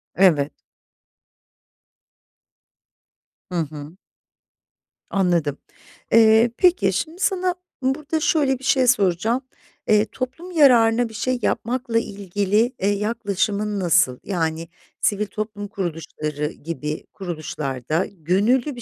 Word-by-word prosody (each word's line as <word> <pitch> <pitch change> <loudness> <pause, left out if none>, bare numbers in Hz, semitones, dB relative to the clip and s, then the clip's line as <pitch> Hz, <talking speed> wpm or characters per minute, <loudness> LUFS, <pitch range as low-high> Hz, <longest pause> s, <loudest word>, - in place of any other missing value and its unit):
Evet. 155 -7 +4 3.0
Hı - - -4 0.2
hı. 150 +3 -9 1.1
Anladım, 170 -7 +1 0.5
eee, 225 +1 +6
peki, 365 +1 +3
şimdi 335 +4 -3
sana 370 -2 +1 0.3
burada 290 +4 -1
şöyle 285 -5 +2
bir - - -16
şey 270 -1 +3
soracağım. 220 +1 +2 0.5
Eee, 210 0 +4
toplum 265 +8 -6
yararına 240 -7 +5
bir - - -13
şey 255 +3 -1
yapmakla 240 0 0
ilgili, 205 +3 0
eee, 195 - 0
yaklaşımın 205 -1 -1
nasıl? 170 -7 +3
Yani 165 -3 -2 0.3
sivil 210 0 +1
toplum 210 -1 -5
kuruluşları 160 -6 -4
gibi 150 -1 -5
kuruluşlarda 155 -3 -3
gönüllü 205 - +1
bir 240 - -9
210 Hz, 100 wpm, -22 LUFS, 175-250 Hz, 3.0 s, eee